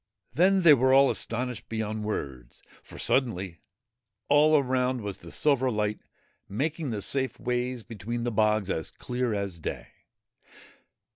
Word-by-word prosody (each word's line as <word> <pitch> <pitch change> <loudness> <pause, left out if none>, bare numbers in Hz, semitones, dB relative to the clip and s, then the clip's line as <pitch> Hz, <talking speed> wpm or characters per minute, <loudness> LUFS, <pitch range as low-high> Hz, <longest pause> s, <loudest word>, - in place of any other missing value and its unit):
Then 185 +6 +3
they 160 -3 +9
were 130 -1 +3
all 135 0 +6
astonished 125 0 -3
beyond 110 -1 -3
words, 65 - -5 0.2
for, - - -13
suddenly, 95 -9 0 0.7
all 150 +2 +5
around 130 -2 0
was 100 -2 -5
the - - -12
silver 135 -3 +2
light, 105 -2 -1 0.5
making 150 - -2
the 105 -4 -3
safe 130 +5 -2
ways 125 -1 -2
between 115 +3 -5
the 120 - -1
bogs 105 -2 +1
as 80 - -3
clear 125 -2 -3
as 100 -4 -4
day. - - -5
120 Hz, 140 wpm, -27 LUFS, 105-130 Hz, 0.7 s, they